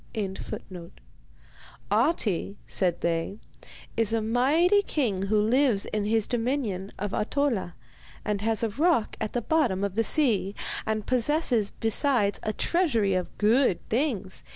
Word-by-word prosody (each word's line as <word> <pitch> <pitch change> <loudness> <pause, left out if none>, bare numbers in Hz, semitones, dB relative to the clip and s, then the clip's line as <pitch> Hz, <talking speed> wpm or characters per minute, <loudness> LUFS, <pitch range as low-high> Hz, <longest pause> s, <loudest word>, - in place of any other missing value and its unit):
] - - -29 1.9
'Ahti,' 205 - +1
said 180 -3 0
they, 170 +4 -1 0.6
'is 225 -1 +2
a 225 - +2
mighty 285 - +3
king 215 - -1
who 215 +1 +2
lives 230 -1 +2
in 210 -1 -2
his 220 0 +2
dominion 230 -6 -2
of 205 0 -3
Ahtola, 225 -7 -1 0.5
and 205 -1 -1
has 225 0 0
a 225 - +1
rock 290 - +1
at 215 - -3
the 245 - -1
bottom 260 - +1
of 200 -2 -1
the 225 +3 +1
sea, 220 -8 +1 0.3
and 215 -1 -1
possesses 250 -4 +2
besides 225 -2 +1
a 215 - -2
treasury 235 - +1
of 185 -1 -3
good 225 -1 +2
things. 220 -7 -2
220 Hz, 135 wpm, -26 LUFS, 200-265 Hz, 1.9 s, mighty